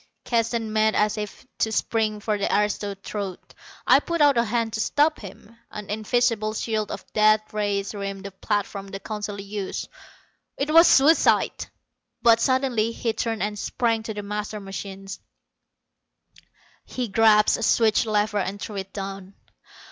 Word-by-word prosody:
Keston 230 -2 -1
made 215 0 +2
as 210 0 +2
if 210 +3 -7
to 220 - +1
spring 220 -1 0
for 215 0 0
the 200 - -1
aristo's 205 -1 0
throat. 200 -4 -6 0.3
I - - +6
put 340 -1 -3
out 290 -2 +5
a 235 0 +2
hand 230 0 -1
to 220 - -3
stop 295 +7 +2
him. 205 +2 -12
An 210 -1 -8
invisible 220 0 0
shield 215 -1 -2
of - - -7
death 215 0 +3
rays 205 -1 -1
rimmed 195 -1 -5
the 200 - -7
platforms 200 0 -3
the 195 0 -6
Council 210 -1 -5
used. 200 -1 -5 0.7
It 285 +2 -1
was 330 +1 +8
suicide! 295 +5 +4 0.5
But 230 -1 +5
suddenly 250 -3 +1
he 230 -1 -2
turned 225 -2 -2
and 210 0 -3
sprang 230 0 0
to 220 0 -5
the 205 - -5
master 210 +1 -4
machine. 195 0 -7 1.8
He 250 -2 -4
grasped 210 0 +4
a - - -6
switch 225 0 +3
lever 210 0 +1
and 200 +1 -3
threw 205 0 -6
it 195 0 -6
down. 195 -1 -7
215 Hz, 155 wpm, -24 LUFS, 205-230 Hz, 1.8 s, was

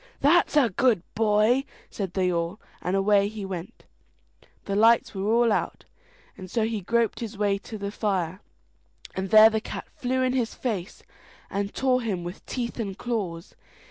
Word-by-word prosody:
"That's 300 +2 +3
a 250 -7 +4
good 220 -2 +2
boy!" 220 +4 +3 0.3
said 195 -3 -5
they 185 -2 +1
all, 170 +4 -2 0.2
and 180 +2 -1
away 200 0 +3
he 210 -1 -6
went. 185 -2 -7 0.8
The 200 - -2
lights 225 +2 +4
were 200 +2 -1
all 235 0 +4
out, - - -2 0.5
and 185 -2 -10
so 225 +3 0
he 220 -1 -2
groped 230 +4 0
his 225 -3 -6
way 200 -1 +1
to 220 - -8
the 200 0 -4
fire, 190 -4 -2 0.7
and 190 0 -3
there 215 +2 +8
the 220 0 -1
cat - - -6
flew 260 -3 -1
in 255 0 +1
his 245 -3 -1
face, 200 -8 -4 0.5
and 200 +1 -2
tore 255 -1 +1
him 200 -7 -2
with 175 +2 -8
teeth 240 -1 -4
and 200 -4 -4
claws. 190 -8 -4
210 Hz, 175 wpm, -26 LUFS, 190-235 Hz, 0.8 s, there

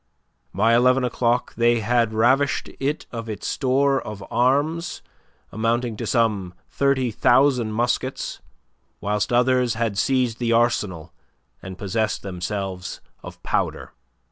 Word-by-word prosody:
By 110 +5 +2
eleven 125 +2 +4
o'clock 120 0 0
they 120 0 +2
had 115 0 +1
ravished 130 +6 +2
it 145 +3 -2
of 115 -1 -6
its 105 -2 -6
store 135 +1 +1
of 105 -2 -8
arms 145 +8 0 0.5
amounting 115 +2 -1
to - - -4
some 105 -7 0 0.2
thirty 140 -3 +1
thousand 125 -1 +3
muskets, 120 +3 -2 0.6
whilst 105 +2 -1
others 125 -1 +2
had 110 -3 -1
seized 125 -4 +1
the 120 -1 +1
Arsenal 100 - 0 0.5
and 95 -1 -8
possessed 110 +2 -2
themselves 95 0 -4 0.2
of - - -11
powder. - - -2
115 Hz, 120 wpm, -23 LUFS, 105-130 Hz, 0.6 s, eleven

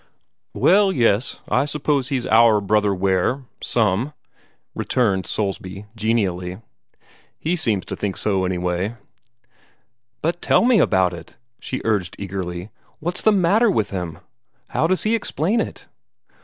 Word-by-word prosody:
"Well, 195 +2 +4
yes, 120 - +1
I - - +2
suppose 145 -2 0
he's 130 -3 -1
OUR 110 -1 +5
Brother 105 0 +2
Ware 95 +7 0 0.2
some," 115 +5 +1 0.6
returned 100 -7 0
Soulsby, 100 -1 -3
genially. 95 -5 -1 0.8
"He 165 +3 -1
seems 115 - 0
to - - -5
think 100 -2 -3
so, 95 -3 0
anyway." 90 +3 -1 1.3
"But 170 +2 -1
tell - - +3
me 245 -3 +5
about 95 -2 +3
it!" 85 -1 -11 0.2
she 130 - -5
urged 105 -6 0
eagerly. 95 0 -5 0.3
"What's 175 +3 -2
the 215 - +4
matter 205 +4 +3
with 110 - 0
him? 90 -4 -4 0.5
How 160 - +1
does 185 +1 0
he 215 - +1
explain 215 - 0
it?" - - -6
110 Hz, 130 wpm, -21 LUFS, 95-150 Hz, 1.3 s, OUR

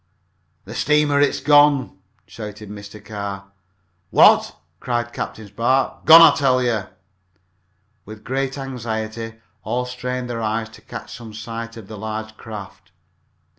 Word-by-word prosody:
"The - - -9
steamer! 150 -1 +2
It's 145 - +2
gone!" 145 -6 +4 0.3
shouted 105 -1 -9
Mr. 100 0 -10
Carr. 100 -2 -6 0.6
"What!" - - +5 0.2
cried 120 -1 -2
Captain 110 - -5
Spark. 120 +6 0
"Gone, 165 +1 +11
I - - +7
tell 130 -3 +3
you!" 115 -5 0 1.2
With 110 +1 -11
great 135 +1 -2
anxiety 115 -4 -5 0.3
all 125 +1 -2
strained 125 0 -4
their 120 -1 -4
eyes 110 0 -2
to 110 - -16
catch - - -9
some 115 -3 -10
sight 115 +1 -6
of 110 -4 -10
the 110 -1 -9
large 110 +1 -5
craft. 105 -4 -10
115 Hz, 130 wpm, -21 LUFS, 110-130 Hz, 1.2 s, Gone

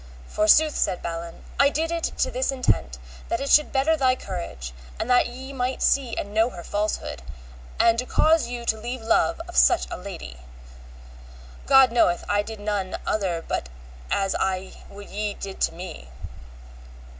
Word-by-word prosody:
Forsooth, 290 - +4
said 180 - 0
Balin, 170 0 -6 0.2
I 280 - +6
did 320 +3 -1
it 335 -1 -1
to - - -1
this - - 0
intent 65 - 0 0.3
that - - -1
it 275 0 -2
should 300 - +5
better 280 +4 +2
thy 260 -4 +3
courage, 170 - -6 0.3
and - - -2
that 245 - +5
ye 260 +3 -9
might 255 0 -2
see 265 -4 +2
and 205 - -4
know 220 +2 +3
her 175 -7 -9
falsehood, 205 - -3 0.6
and 230 0 +4
to 250 - -3
cause 320 -4 +3
you 240 -1 -6
to 220 -1 0
leave 240 +1 -5
love 230 +9 +2
of 350 - -10
such 360 - +5
a - - -4
lady; 180 - -8 1.3
God 270 -3 +7
knoweth 230 -7 +2
I 205 0 +2
did 220 +1 -8
none 205 -2 -2
other 180 -6 -1
but 60 - -3 0.4
as 195 -1 +1
I 190 0 -2 0.2
would 200 0 -11
ye 210 0 -3
did 195 -1 -8
to - - +2
me. 170 - -9
220 Hz, 170 wpm, -24 LUFS, 190-265 Hz, 1.3 s, God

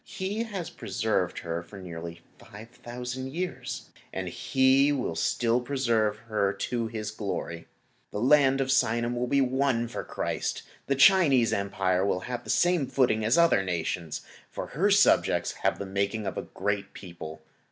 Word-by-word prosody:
He 195 +4 -4
has 195 -6 -5
preserved 105 -4 -1
her 85 0 -3
for 95 +4 -12
nearly 85 -2 -8 0.2
5,000 125 +4 -7
years, 135 -8 -5 0.2
and - - -4
He 135 +2 +3
will 130 -11 -1
still 115 +8 +1
preserve 120 -5 +1
her 100 -3 +1
to 120 -2 -2
His 110 -1 -4
glory. 95 -5 -5 0.4
The 105 - -4
Land 135 +2 +4
of 135 - -1
Sinim 120 -2 +2
is 120 - -3
to 125 - 0
be 140 +2 +3
won 130 -2 +1
for 120 - -5
Christ. - - -3 0.2
The 140 - +2
Chinese 135 -6 +5
Empire 95 -2 0
will 95 -2 0
then 95 - -8
have 120 -1 -4
the 110 - -12
same 175 +1 +3
footing 125 -4 +2
as 115 +7 +3
other 170 -11 +5
nations, 85 -3 -3 0.3
for - - -5
her - - +2
subjects - - +4
have - - +1
the 100 - -5
making 100 +2 -1
of 95 - -3
a - - -2
great 100 -1 -2
people. 80 -4 -9
115 Hz, 165 wpm, -28 LUFS, 100-135 Hz, 0.4 s, Chinese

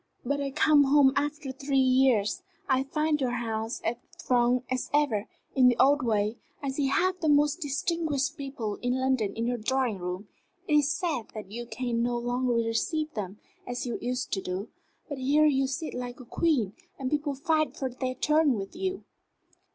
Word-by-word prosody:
"But 285 +3 0
I 280 - -1
come 295 0 +4
home 275 -1 +5
after 290 -1 -1
three 275 +1 -2
years. 260 - +3 0.3
I 260 -1 +3
find 300 +1 0
your 245 -2 0
house 225 0 -3
as 230 +1 -1 0.2
thronged 245 0 +2
as 255 -1 -1
ever, 255 -9 +1 0.3
in 260 -2 +5
the 245 -1 +4
old 285 +2 +5
way. 215 -1 +1 0.2
I 280 - -3
see 275 +1 0
half 370 +6 +1
the 315 - +1
most 295 +3 +3
distinguished 300 0 -1
people 270 -8 -4
in 245 +1 0
London 260 -6 +1
in 230 +1 -1
your 245 0 -1
drawing 245 -2 0
room. 180 +3 -5 0.4
It 305 - 0
is 295 0 +3
sad 315 - -2
that 210 -2 -7
you 240 +2 -6
can 240 -2 -2
no 240 0 0
longer 245 +1 0
receive 270 - 0
them 200 -2 -5 0.3
as 245 +1 -3
you 240 - -3
used 250 +1 -2
to 195 - 0
do: 185 +3 -4 0.4
but 285 -4 -5
here 290 +4 +4
you 270 -3 +3
sit 315 +4 -4
like 245 0 -5
a 255 - -10
queen, 245 - +1 0.2
and 260 -1 -3
people 295 -1 0
fight 310 +2 0
for 265 - -1
their 255 +1 -3
turn 300 +1 +3
with 195 +4 -6
you." 380 +1 -3
260 Hz, 190 wpm, -28 LUFS, 240-295 Hz, 0.4 s, home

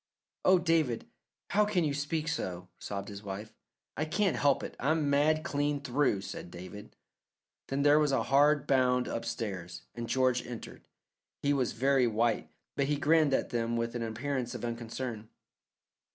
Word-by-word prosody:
"Oh, 185 0 +6
David, 165 -9 +1 0.5
how 210 - +4
can 205 -4 +1
you 150 -2 0
speak 150 +2 -2
so?" 90 - -3
sobbed 100 -1 -5
his 100 -1 -8
wife. 105 +2 -7 0.4
"I 155 - -1
can't 190 +2 +1
help 140 -2 +2
it. - - -6
I'm 150 +1 +1
mad 155 +2 +3
clean 145 -2 0
through," 135 -6 +1
said 90 - -7
David. 90 +4 -10 0.7
Then 140 +1 -1
there 145 +1 +6
was 150 -2 +2
a 135 - +2
hard 145 +2 +4
bound 125 -2 +3
upstairs, 90 -7 -4
and 120 -1 -6
George 130 -2 +2
entered. 120 -2 -9 0.6
He 145 0 +3
was 130 -4 0
very 135 +1 +3
white, 115 +1 +1 0.3
but 140 - +1
he 150 - +1
grinned 150 -1 +3
at - - -2
them 115 -1 0
with 115 0 -1
an 120 - -3
appearance 120 +2 -3
of - - -4
unconcern. 115 -1 -5
130 Hz, 165 wpm, -31 LUFS, 115-145 Hz, 0.7 s, Oh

